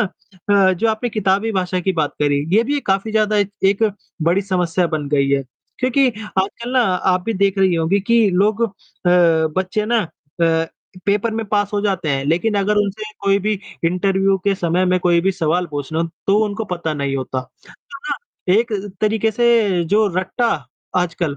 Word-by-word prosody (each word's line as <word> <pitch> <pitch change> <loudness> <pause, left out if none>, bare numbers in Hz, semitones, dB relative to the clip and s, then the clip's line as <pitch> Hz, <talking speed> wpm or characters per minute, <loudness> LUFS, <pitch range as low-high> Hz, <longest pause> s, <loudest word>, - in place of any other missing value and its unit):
अ, 195 -1 0
जो 205 +6 0
आपने 220 +2 -1
किताबी 210 +1 0
भाषा 185 -2 -1
की 190 +2 0
बात 155 -4 -1
करी, 145 -1 +1
ये 225 - +5
भी 285 +4 0
एक 285 - -5
काफ़ी 195 +3 0
ज़्यादा 215 -1 +2
एक 205 -1 +1
एक 195 +3 +3 0.4
बड़ी 175 +5 +2
समस्या 180 -2 0
बन 155 -3 -3
गई 140 -1 +2
है। 140 0 +2 0.4
क्योंकि 260 +1 +2 0.3
आजकल 220 +5 -2
ना 260 - +4
आप 185 -3 +1
भी 225 - -1
देख 195 0 +1
रही 190 -2 +3
होंगी 165 +5 +1
कि 230 +2 +3
लोग 205 +5 +2
अ, 230 - +2 0.4
बच्चे 175 +3 +2
ना 235 +1 +2 0.4
अ, 165 -1 +2 0.4
पेपर 205 +3 +1
में 220 0 -3
पास 205 0 0
हो 205 - 0
जाते 190 -6 -1
हैं 135 -1 0
लेकिन 170 +9 +1
अगर 210 +1 +1
उनसे 205 +1 -1 0.2
कोई 200 0 +2
भी 215 - +2 0.3
इंटरव्यू 195 +3 +2
के 200 - +2
समय 175 0 0
में 185 0 +2
कोई 175 -1 +3
भी 195 +3 +1
सवाल 175 +1 0
पूछ 145 0 -5
लो, 160 +1 +1 0.2
तो 200 +1 +4
उनको 215 +1 -3
पता 175 -5 -3
नहीं 140 -1 -2
होता। 130 0 -3 0.3
तो 275 - -14
ना 290 - -1 0.4
एक 230 +2 +1 0.3
तरीके 220 +1 +1
से 220 -6 +2
जो 210 +6 +2
रट्टा 190 +6 0 0.5
आजकल 170 -4 -1
195 Hz, 190 wpm, -19 LUFS, 170-215 Hz, 0.5 s, ये